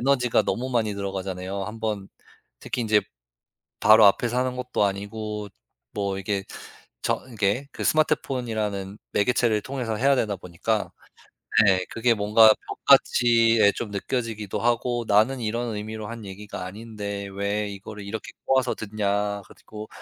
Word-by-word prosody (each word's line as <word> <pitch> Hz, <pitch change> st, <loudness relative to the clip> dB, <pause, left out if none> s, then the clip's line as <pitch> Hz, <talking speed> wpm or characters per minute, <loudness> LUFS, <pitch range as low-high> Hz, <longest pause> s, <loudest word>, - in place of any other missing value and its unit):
에너지가 125 Hz, -2 st, +3 dB
너무 130 Hz, +2 st, -2 dB
많이 110 Hz, -4 st, 0 dB
들어가잖아요. 95 Hz, -1 st, -4 dB
한번 110 Hz, -2 st, -4 dB, 0.5 s
특히 125 Hz, -, -3 dB
인제 105 Hz, -2 st, +3 dB, 0.8 s
바로 110 Hz, 0 st, +7 dB
앞에 100 Hz, +4 st, +4 dB
사는 125 Hz, +1 st, -1 dB
것도 125 Hz, -4 st, -1 dB
아니고 105 Hz, +1 st, -3 dB, 0.4 s
뭐 100 Hz, -2 st, -2 dB
이게 95 Hz, 0 st, -2 dB, 0.6 s
저 -, -, -1 dB
이게 110 Hz, +5 st, 0 dB
그 -, -, -6 dB
스마트폰이라는 110 Hz, -9 st, 0 dB, 0.2 s
매개체를 110 Hz, 0 st, +2 dB
통해서 125 Hz, -4 st, -3 dB
해야 135 Hz, +3 st, +4 dB
되다 105 Hz, -5 st, 0 dB
보니까 90 Hz, +5 st, -2 dB, 0.7 s
네 95 Hz, -1 st, +4 dB
그게 115 Hz, +1 st, +2 dB
뭔가 110 Hz, +1 st, +6 dB, 0.2 s
벽같이 115 Hz, -2 st, +4 dB
예 100 Hz, 0 st, +6 dB
좀 115 Hz, -, -5 dB
느껴지기도 110 Hz, -1 st, -3 dB
하고 120 Hz, 0 st, 0 dB
"나는 110 Hz, +5 st, +3 dB
이런 115 Hz, +1 st, -2 dB
의미로 110 Hz, +1 st, -5 dB
한 115 Hz, -1 st, -7 dB
얘기가 100 Hz, 0 st, -7 dB
아닌데 100 Hz, 0 st, -6 dB
왜 100 Hz, +1 st, -1 dB
이거를 100 Hz, +1 st, -8 dB
이렇게 105 Hz, +1 st, -6 dB
꼬아서 130 Hz, -2 st, +2 dB
듣냐." 105 Hz, -1 st, -1 dB
그리고 105 Hz, 0 st, -11 dB
110 Hz, 315 characters per minute, -25 LUFS, 100-120 Hz, 0.8 s, 바로